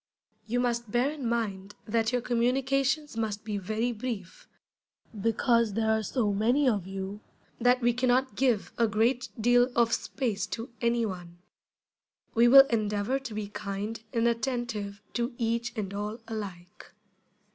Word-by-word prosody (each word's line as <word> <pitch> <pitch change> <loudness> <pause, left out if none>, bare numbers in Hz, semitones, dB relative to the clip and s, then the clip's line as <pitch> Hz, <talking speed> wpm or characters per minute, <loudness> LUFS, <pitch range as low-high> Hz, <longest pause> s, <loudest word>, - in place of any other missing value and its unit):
You 245 +3 0
must 235 -2 -1
bear 245 +6 +1
in 290 -5 -4
mind 205 -4 -2
that 225 +1 +1
your 250 -1 0
communications 270 +4 +1
must 215 -2 -2
be 210 -2 -3
very 220 +5 -1
brief, 220 -5 -6 0.7
because 230 0 +2
there 220 +1 +1
are 220 0 +2
so 215 -1 0
many 240 +8 +2
of 205 -7 +1
you 195 +2 -5 0.4
that 250 +2 +3
we 240 0 +3
can 250 +2 0
not 255 +1 +2
give 245 -6 +1
a 230 - +4
great 230 +4 +1
deal 245 +2 +4
of 235 -1 +3
space 220 -7 -2
to 230 +1 -7
any 235 -1 +2
one. 175 -4 -7 1.0
We 235 +1 +5
will 270 +2 +10
endeavor 210 +3 0
to 260 -5 -7
be 210 -1 -4
kind 210 +2 -5
and 230 0 +2
attentive 230 -4 -2
to 240 +1 -2
each 235 0 -1
and 200 -2 -3
all 210 +2 -3
alike. 190 -5 -8
230 Hz, 155 wpm, -28 LUFS, 210-245 Hz, 1.0 s, will